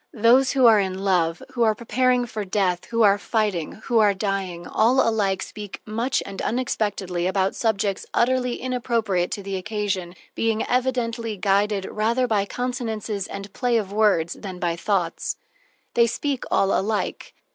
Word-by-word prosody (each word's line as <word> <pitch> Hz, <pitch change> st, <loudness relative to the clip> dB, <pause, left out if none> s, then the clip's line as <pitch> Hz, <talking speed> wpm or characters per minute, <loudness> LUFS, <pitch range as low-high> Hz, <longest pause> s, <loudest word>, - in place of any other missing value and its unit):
Those 245 Hz, +4 st, +4 dB
who 265 Hz, -2 st, +4 dB
are 225 Hz, -2 st, +7 dB
in 190 Hz, -1 st, -2 dB
love, 175 Hz, -4 st, +1 dB
who 250 Hz, -2 st, -4 dB
are 220 Hz, -2 st, +4 dB
preparing 250 Hz, +2 st, +1 dB
for 220 Hz, -2 st, -5 dB
death, 185 Hz, -2 st, 0 dB
who 230 Hz, -1 st, +1 dB
are 200 Hz, -1 st, +5 dB
fighting, 205 Hz, -8 st, -1 dB
who 235 Hz, -3 st, +2 dB
are 205 Hz, -2 st, +4 dB
dying, 190 Hz, -3 st, -3 dB
all 245 Hz, +4 st, +3 dB
alike 200 Hz, -4 st, +1 dB
speak 205 Hz, -2 st, -8 dB
much 230 Hz, +5 st, -1 dB
and 195 Hz, -1 st, -6 dB
unexpectedly 205 Hz, -7 st, -1 dB
about 190 Hz, 0 st, +1 dB
subjects 205 Hz, -3 st, -1 dB
utterly 250 Hz, 0 st, +1 dB
inappropriate 230 Hz, -8 st, -1 dB
to 200 Hz, -, -5 dB
the 195 Hz, 0 st, -3 dB
occasion, 190 Hz, -3 st, -3 dB, 0.2 s
being 225 Hz, -1 st, 0 dB
evidently 240 Hz, -3 st, -1 dB
guided 200 Hz, +1 st, +1 dB
rather 230 Hz, +5 st, 0 dB
by 210 Hz, -4 st, +1 dB
consonances 225 Hz, -4 st, -3 dB
and 200 Hz, 0 st, -8 dB
play 245 Hz, -2 st, +1 dB
of 200 Hz, -3 st, -3 dB
words 205 Hz, -6 st, +2 dB
than 190 Hz, -3 st, -8 dB
by 175 Hz, -2 st, -1 dB
thoughts. 175 Hz, -1 st, -1 dB, 0.6 s
They 235 Hz, 0 st, +4 dB
speak 275 Hz, +3 st, -2 dB
all 195 Hz, 0 st, +2 dB
alike. 210 Hz, +2 st, -2 dB
210 Hz, 155 wpm, -23 LUFS, 195-235 Hz, 0.6 s, are